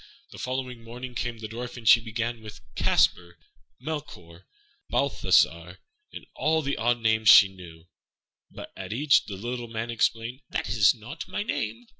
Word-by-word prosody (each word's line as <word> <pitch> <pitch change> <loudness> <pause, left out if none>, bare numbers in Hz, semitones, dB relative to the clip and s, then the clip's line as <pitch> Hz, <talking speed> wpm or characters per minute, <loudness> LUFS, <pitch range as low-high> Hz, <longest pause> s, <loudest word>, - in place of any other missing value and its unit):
The - - -11
following 125 -2 -4
morning 125 +2 -8
came 120 -1 -3
the 110 -1 -7
Dwarf, 120 +3 -7
and 115 -2 -8
she 115 - +8
began 115 0 -4
with 105 -9 -11
"Caspar," 85 +3 +1 0.4
"Melchior," 105 - -8 0.4
"Balthassar," - - +2 0.3
and - - -10
all 160 0 0
the 140 0 -1
odd 120 +2 0
names 110 -1 +3
she 95 - +9
knew; 85 -3 -13 0.6
but - - -10
at - - -6
each 140 +4 +3
the 100 - -7
little 120 +3 -5
Man 115 +1 -4
exclaimed, 115 +3 -1
"That - - -3
is 105 -3 +4
not 120 +9 -9
my 185 +2 -3
name." 115 - -4
115 Hz, 160 wpm, -26 LUFS, 110-125 Hz, 0.6 s, she